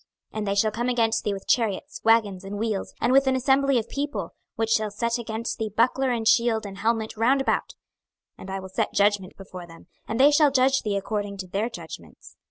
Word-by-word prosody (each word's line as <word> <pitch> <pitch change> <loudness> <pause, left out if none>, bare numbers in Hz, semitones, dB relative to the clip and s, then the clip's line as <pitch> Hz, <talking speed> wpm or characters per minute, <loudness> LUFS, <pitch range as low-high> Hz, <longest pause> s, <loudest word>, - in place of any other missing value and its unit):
26:023:024 - - -7
And 210 - -3
they 200 - 0
shall 215 +2 +2
come 240 +3 -2
against 230 -2 +1
thee 205 - -1
with 195 - -8
chariots, 225 -5 0
wagons, 215 -4 +2
and 195 +1 -6
wheels, 215 -2 -2
and 250 - +2
with 270 0 +4
an 265 - +3
assembly 270 +1 +2
of 230 -1 -1
people, 290 +1 -4 0.2
which 225 0 -1
shall 215 -1 +2
set 235 +3 -2
against 230 0 -4
thee 220 -1 -2
buckler 250 +5 +1
and 230 -3 -1
shield 230 -1 +3
and 195 -1 -8
helmet 220 +1 -1
round 250 +5 +3
about: 270 - -1 0.6
and 190 - -11
I 195 0 -3
will 190 0 -9
set 185 - -2
judgment 200 -2 +1
before 185 -2 -10
them, 165 0 -15 0.2
and 225 - -3
they 285 +3 +7
shall 295 0 +5
judge 270 0 +3
thee 205 -2 -1
according 205 0 -3
to 190 -1 -6
their 200 +6 -2
judgments. - - -11
225 Hz, 220 wpm, -25 LUFS, 200-245 Hz, 0.6 s, they